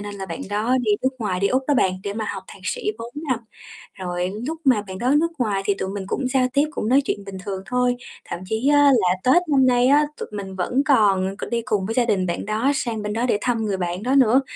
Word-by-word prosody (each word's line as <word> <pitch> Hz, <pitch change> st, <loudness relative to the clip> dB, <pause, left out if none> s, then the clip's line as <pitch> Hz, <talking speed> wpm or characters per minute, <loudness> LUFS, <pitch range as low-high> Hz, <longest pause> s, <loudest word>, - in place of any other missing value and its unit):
nên 205 Hz, 0 st, -6 dB
là 195 Hz, -1 st, -6 dB
bạn 170 Hz, -, -6 dB
đó 220 Hz, +5 st, +1 dB
đi 215 Hz, -4 st, +1 dB
nước 260 Hz, -, +3 dB
ngoài, 195 Hz, -6 st, -2 dB
đi 200 Hz, -, +3 dB
Úc 260 Hz, +1 st, +1 dB
đó 290 Hz, -, +4 dB
bạn, 190 Hz, -7 st, +3 dB
để 200 Hz, -, -3 dB
mà 220 Hz, +1 st, -3 dB
học 190 Hz, -, -5 dB
thạc 195 Hz, -, -13 dB
sĩ -, -, -1 dB
4 230 Hz, +1 st, -7 dB, 0.2 s
năm. 255 Hz, -, +1 dB, 0.6 s
Rồi 180 Hz, -1 st, -3 dB, 0.2 s
núc 320 Hz, +1 st, -3 dB
mà 250 Hz, -6 st, +4 dB
bạn 190 Hz, 0 st, -6 dB
đó 250 Hz, +7 st, +1 dB
nước 335 Hz, +1 st, 0 dB
ngoài 205 Hz, -5 st, 0 dB
thì 200 Hz, -, +2 dB
tụi 190 Hz, -1 st, -4 dB
mình 195 Hz, -1 st, -4 dB
cũng 265 Hz, -, -2 dB
giao 255 Hz, -1 st, +3 dB
tiếp, 285 Hz, +1 st, +3 dB
cũng 220 Hz, -, -3 dB
nói 270 Hz, +3 st, +5 dB
chuyện -, -, -1 dB
bình 195 Hz, -1 st, -7 dB
thường 190 Hz, -2 st, -4 dB
thôi, 250 Hz, +2 st, +1 dB, 0.3 s
thậm -, -, -5 dB
chí 220 Hz, +8 st, 0 dB
á, 290 Hz, -, +5 dB, 0.2 s
là 185 Hz, -7 st, +3 dB
Tết 340 Hz, +8 st, +5 dB
năm 270 Hz, -2 st, +5 dB
nay 250 Hz, -1 st, +4 dB
á, 290 Hz, +3 st, +5 dB
tụi -, -, -5 dB
mình 195 Hz, -2 st, -6 dB
vẫn 250 Hz, +10 st, 0 dB
còn 195 Hz, -7 st, +3 dB
c -, -, -6 dB
đi 235 Hz, 0 st, 0 dB
cùng 195 Hz, -3 st, 0 dB
với 225 Hz, -, -2 dB
gia 245 Hz, -2 st, +3 dB
đình 190 Hz, -5 st, +1 dB
bạn 175 Hz, -, -3 dB
đó 220 Hz, +6 st, +1 dB
sang 235 Hz, -5 st, -2 dB
bên 210 Hz, 0 st, -3 dB
đó 230 Hz, +2 st, 0 dB
để 240 Hz, -, +2 dB
thăm 235 Hz, -3 st, 0 dB
người 200 Hz, -2 st, -1 dB
bạn 180 Hz, +1 st, -3 dB
đó 260 Hz, +3 st, +1 dB
nữa. 260 Hz, 0 st, +5 dB
220 Hz, 270 wpm, -22 LUFS, 195-255 Hz, 0.6 s, nói